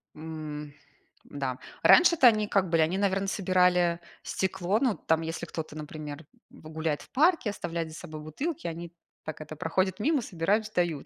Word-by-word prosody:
М, 155 -2 -7 0.5
да 135 -3 -4 0.3
раньше-то 340 -7 +7
они 215 -3 +4
как 190 -3 +1
были, 165 -1 +3
они, 165 +4 +1
наверно, 195 -1 +1
собирали 180 -3 +2 0.2
стекло, 190 +2 0
ну, 250 -6 +2
там, 160 0 +1
если 165 +1 -4
кто-то, 160 -3 -6
например, 150 0 -7 0.2
в 155 - -13
гуляет 155 -1 -2
в - - -15
парке, 310 - +3
оставляет 170 -4 -4
за 155 - -10
собой 155 -1 -8
бутылки, 265 - -4
они 170 0 -6 0.3
так 155 - -6
это, 155 0 -8
проходят 185 +5 0
мимо, 295 +4 +2
собирают, 200 +2 0
сдают. 175 -8 -1
170 Hz, 165 wpm, -28 LUFS, 155-200 Hz, 0.5 s, раньше-то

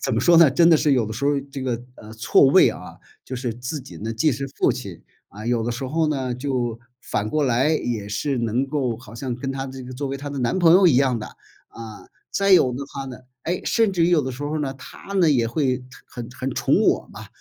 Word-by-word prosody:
怎 125 - 0
么 115 - +1
说 170 +6 +5
呢 165 -4 +7
真 165 +5 +5
的 160 - +7
是 150 -1 +2
有 125 -4 +2
的 110 - -5
时 140 +5 -4
候 145 -1 +2
这 135 0 -6
个， 120 -3 -2 0.2
呃， 110 0 -12
错 110 +5 +4
位 135 - +6
啊。 - - -10 0.3
就 130 - -6
是 125 -2 -3
自 125 +6 -5
己 135 - -12
呢 110 +2 -4
既 115 +8 +2
是 140 +1 -3
父 135 - 0
亲， - - -6 0.3
啊， 105 +3 -10
有 120 -1 0
的 120 - -1
时 130 +3 -5
候 160 +4 0
呢 135 -4 -1
就 125 -3 -2 0.2
反 105 +1 -2
过 155 +5 0
来， 130 +3 +2
也 115 -9 -2
是 135 +6 -2
能 115 +3 0
够 135 -5 -1
好 120 -1 -14
像 125 +1 -4
跟 135 +3 -4
她 135 0 -4
这 130 0 -8
个 125 +1 -9
作 140 +3 -4
为 135 0 -3
她 145 +1 -7
的 140 - -5
男 125 +6 0
朋 165 -2 +6
友 185 +1 +6
一 150 -8 +5
样 130 -3 +2
的。 110 - -6 0.4
啊， 110 -2 -11 0.2
再 200 0 +2
有 130 -9 +5
的 125 - -5
话 135 0 -7
呢 130 -1 -8 0.2
哎， 175 +2 -2
甚 225 -4 +2
至 175 -3 +2
于 170 - +2
有 165 -4 +4
的 130 - -3
时 130 +3 -7
候 150 +2 -2
呢， 135 -2 -2
她 135 +8 -11
呢 180 -4 +4
也 120 -5 +2
会 130 -1 -1 0.2
很 120 -2 -8
很 130 +1 -5
宠 - - +2
我 - - +1
嘛， - - -10
130 Hz, 275 characters per minute, -22 LUFS, 120-150 Hz, 0.4 s, 呢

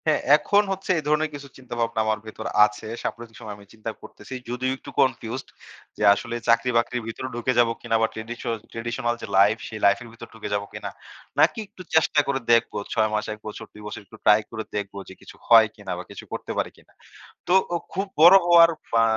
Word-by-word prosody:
হ্যাঁ, 155 -1 +3 0.2
এখন 205 +6 +3
হচ্ছে 195 0 -2
এই - - -7
ধরনের 150 +1 +2
কিছু 140 -1 -8
চিন্তাভাবনা 120 -3 -3
আমার 110 0 0
ভেতর 110 0 -8 0.2
আছে। 105 +1 -6 0.2
সাম্প্রতিক 115 -1 -6
সময় 105 -1 -7
আমি 100 - -16
চিন্তা 110 0 -6
করতেসি। 130 - -10
যদিও 125 +1 -1
একটু - - -12
confused 130 -1 0 0.5
যে - - -3
আসলে 115 +3 -5
চাকরি-বাকরির 115 0 +2
ভেতরে 115 +3 -5
ঢুকে 120 +2 0
যাব 120 -1 +5
কিনা? 115 - -1
বা 110 - +4 0.7
traditional 120 +1 -2
যে - - -6
লাইফ 105 +3 +5
সে 110 - -8
লাইফের 110 +4 +3
ভেতর 115 - -11
ঢুকে 115 -2 -7
যাব 100 0 0
কিনা। - - -6 0.5
নাকি - - +4
একটু 190 - -14
চেষ্টা 160 -1 +4
করে 140 -1 0
দেখবো। 115 - +2 0.2
৬ 110 0 +2
মাস 105 - 0
১ 105 - -12
বছর 105 - -7
২ 105 - -13
বছর 105 - -7
একটু 110 +3 -15
ট্রাই 105 0 +7
করে 110 - -4
দেখবো 100 -1 -4
যে - - -10
কিছু - - -13
হয় - - +8
কিনা - - -8
বা - - -6
কিছু - - -9
করতে - - -5
পারে - - 0
কিনা। - - -23 0.6
তো 180 - +2 0.2
ও - - +2 0.2
খুব 195 +4 -1 0.2
বড় 175 +4 +10
হওয়ার 170 -1 +7 0.2
বা 115 0 +5
115 Hz, 205 wpm, -24 LUFS, 110-135 Hz, 0.7 s, বড়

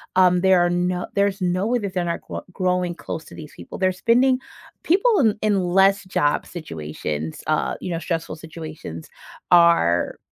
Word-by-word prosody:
um, 180 -1 +5
there 190 -2 +4
are 175 - +1
no 180 0 -1
there's 200 -1 +1
no 185 +3 0
way 245 +1 +1
that 200 -4 -5
they're 180 -2 -1
not 170 - -3
gro - - -7
growing 180 -2 0
close 165 -1 -6
to - - -13
these 155 -2 -10
people. - - -9
They're 185 -1 +2
spending 250 +6 +3 0.4
People 405 +5 +3
in 220 -5 +3
in 210 -2 +2
less 195 +3 +3
job 145 -6 0
situations, 80 - -6
uh, 155 0 0
you - - -5
know, 165 - -2
stressful 165 -1 -3
situations 155 - -9 0.4
are 170 - +4
180 Hz, 175 wpm, -22 LUFS, 160-195 Hz, 0.4 s, um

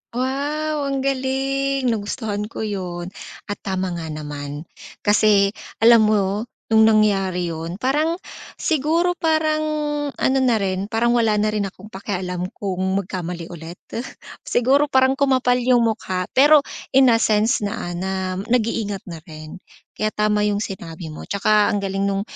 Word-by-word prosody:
Wow, 285 +3 -1
ang 275 -1 -1
galing 270 0 0
nagustuhan 210 -1 -3
ko 220 - -6
'yun. 185 -4 -4 0.3
At 205 - -6
tama 190 -1 -2
nga 170 -2 -5
naman, 145 -1 -6 0.4
kasi 205 -1 +4 0.3
alam 230 -2 +7
mo 205 +1 +1 0.2
nung 220 0 +6
nangyari 195 -5 +2
'yun 165 +2 -5
parang 295 - +1 0.4
siguro 330 +3 +1
parang 315 -1 +1 0.5
ano 265 +1 +1
na 255 -3 +3
rin, 195 -1 -1
parang 235 +2 +1
wala 225 -3 +3
na 215 +1 +1
rin 210 -2 -1
akong 195 +3 -13
pakialam 180 -2 -4
kung 190 -3 -4 0.2
magkamali 175 -2 -6
ulit. 170 +1 -9 0.7
Siguro 275 +4 +3
parang 260 -1 +4
kumapal 255 -3 +3
'yung 245 -1 +3
mukha 210 -5 -1
pero 290 +2 +6 0.3
in 265 -2 +7
a 230 - +4
sense 220 +2 +2
na, 200 -4 -4
ah, - - -5
na 190 +2 -3 0.4
nag-iingat 220 -4 0
na 165 - -7
rin. 155 +1 -10 0.4
Kaya 215 0 -1
tama 210 0 +1
'yung 205 0 0
sinabi 170 -5 -6
mo, 155 - -8
tsaka 210 +1 +2
ang 205 - 0
galing 195 0 -1
nung 195 0 0
210 Hz, 150 wpm, -21 LUFS, 190-260 Hz, 0.7 s, alam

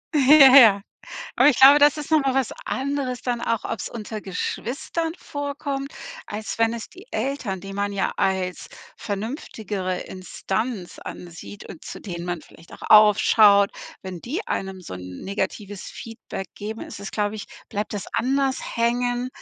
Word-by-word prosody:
Ja, 275 -1 +8
ja. 210 -6 +8 0.6
Aber - - +6
ich 280 - +3
glaube, 275 +2 +9
das 290 0 +5
ist 300 - -6
noch 315 -1 +5
mal 270 -2 0
was 265 -3 0
anderes 265 -2 -2
dann 240 -2 -2
auch, 230 -2 -1
ob's 220 - -4
unter 220 -1 -6
Geschwistern 275 - -3
vorkommt, 285 -1 -4 0.3
als 215 +2 -5
wenn 225 0 +3
es 235 -1 -6
die 375 +5 -15
Eltern, 250 -9 -3
die 195 +1 -8
man 200 +1 -2
ja 195 -1 -1
als 185 -1 -1 0.3
vernünftigere 205 - -4
Instanz 190 +2 -4
ansieht 175 +4 -9
und 165 - -11
zu - - -8
denen 175 -3 -6
man 175 -2 -3
vielleicht 165 - -18
auch - - -13
aufschaut, 210 -1 +6 0.3
wenn 185 -2 -7
die 305 - -4
einem 190 -1 -3
so 170 - -8
'n 90 0 -9
negatives 200 0 -4
Feedback 225 -4 -8
geben, 215 +2 -6
ist - - -9
es, 200 - -6
glaube 210 0 -1
ich 210 - -7 0.2
bleibt 210 0 -3
das 205 -2 -4
anders 270 +2 +1 0.2
hängen, 245 +1 0
220 Hz, 160 wpm, -23 LUFS, 195-265 Hz, 0.6 s, glaube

